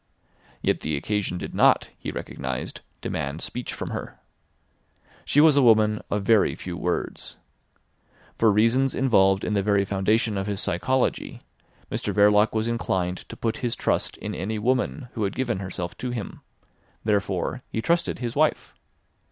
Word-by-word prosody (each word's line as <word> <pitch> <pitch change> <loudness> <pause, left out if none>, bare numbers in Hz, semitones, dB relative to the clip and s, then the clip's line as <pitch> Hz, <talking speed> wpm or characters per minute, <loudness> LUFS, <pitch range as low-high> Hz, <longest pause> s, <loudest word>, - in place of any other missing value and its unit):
Yet - - +2
the 75 -1 -2
occasion 100 +3 -1
did - - -6
not, - - +4
he - - -6
recognised, 65 -2 -5 0.2
demand 70 +4 -3
speech 125 - -4
from - - -5
her. - - -6 1.1
She 145 - +3
was 155 -1 +7
a 140 - +5
woman 110 -3 +4
of 105 -1 -1
very 110 0 +4
few 90 -1 -6
words. 90 +1 -3 1.0
For 110 -2 +4
reasons 115 +6 +3
involved 95 -7 +3
in 105 - -1
the 100 - +2
very 100 0 +2
foundation 105 +2 +1
of 95 - -3
his 100 -2 -2
psychology, 130 +9 0 0.5
Mr - - -2
Verloc 105 +1 +5
was 110 0 -1
inclined 95 -6 -2
to - - -8
put 115 0 -1
his 120 -2 -2
trust - - 0
in - - -5
any 105 +5 -3
woman 125 +3 0
who 110 - -2
had 100 - -1
given 130 -7 -1
herself 90 -2 -5
to 125 - -3
him. 120 -4 -5 0.6
Therefore 100 +2 0
he - - -3
trusted 170 +8 +1
his 120 -2 -4
wife. - - +1
105 Hz, 160 wpm, -25 LUFS, 95-115 Hz, 1.1 s, was